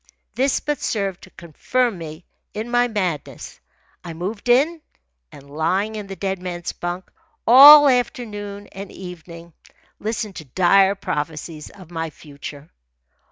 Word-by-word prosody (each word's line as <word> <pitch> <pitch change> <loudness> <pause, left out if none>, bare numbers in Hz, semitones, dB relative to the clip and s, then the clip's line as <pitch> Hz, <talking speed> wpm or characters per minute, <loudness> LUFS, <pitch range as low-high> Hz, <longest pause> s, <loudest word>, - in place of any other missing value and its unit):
This 265 +2 +1
but 295 -2 -3
served 195 -4 -2
to - - -18
confirm 205 - -2
me 160 +1 -9 0.3
in 220 +3 -5
my 245 0 +3
madness. 185 - -4 0.4
I 170 - -7
moved 200 +7 -5
in, 305 +7 +3 0.5
and, 140 - -14
lying 185 +9 -1
in 210 -2 -6
the 195 - -7
dead 190 0 -3
man's 175 -1 -5
bunk, 175 +1 -6 0.3
all 290 +5 +10
afternoon 215 -5 -2
and 195 0 -9
evening 170 -2 -11 0.5
listened 215 -2 -4
to 155 - -8
dire 190 +7 +3
prophecies 155 -2 -5
of 185 -3 -15
my 165 -1 -3
future. 145 0 -11
195 Hz, 135 wpm, -21 LUFS, 170-225 Hz, 0.5 s, all